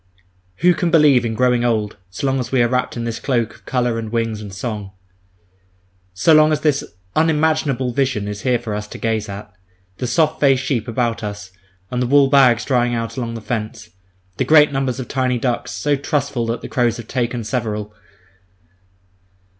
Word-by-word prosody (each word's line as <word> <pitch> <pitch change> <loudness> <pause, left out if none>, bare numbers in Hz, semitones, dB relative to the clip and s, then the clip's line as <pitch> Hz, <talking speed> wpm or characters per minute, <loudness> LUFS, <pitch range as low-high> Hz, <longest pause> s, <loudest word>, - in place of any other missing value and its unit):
Who 180 0 +5
can 175 +1 -1
believe 150 -7 +5
in 110 -1 -2
growing 125 0 +2
old, 110 -3 0
so 95 +9 -5
long 135 0 +1
as 125 -1 -4
we 130 -3 +3
are - - +3
wrapped 125 0 -1
in 120 - -3
this 115 -1 -3
cloak 120 -5 -1
of - - -20
colour 125 -3 0
and 110 -1 -6
wings 115 -2 -1
and 105 -2 -8
song; 105 -1 -5 1.2
so 95 - +3
long 155 0 +6
as 155 - 0
this 150 -3 +1 0.3
unimaginable 155 -5 +1
vision 125 -6 0
is 105 0 -5
here 125 -2 +2
for 115 -3 -6
us 105 0 -4
to - - -9
gaze 110 -2 -2
at—the 95 +1 -9
soft 155 +5 +1
faced 135 -2 +3
sheep 125 -5 -1
about 115 -1 -1
us, 105 -2 -6 0.4
and 125 0 -1
the 125 - 0
wool 140 +1 +5
bags 125 -4 +5
drying 120 -2 +1
out 115 0 -3
along 115 -2 -4
the 115 - -6
fence, 110 0 -5 0.5
and - - 0
great 150 -2 +6
numbers 135 -2 -1
of 130 - -5
tiny 130 -1 0
ducks, 120 0 -2
so 145 -1 0
trustful 140 -4 -2
that 115 +1 -2
the - - -6
crows 120 -2 0
have 115 -2 -9
taken 120 -2 -2
several. 105 -3 -3
120 Hz, 190 wpm, -19 LUFS, 110-135 Hz, 1.2 s, long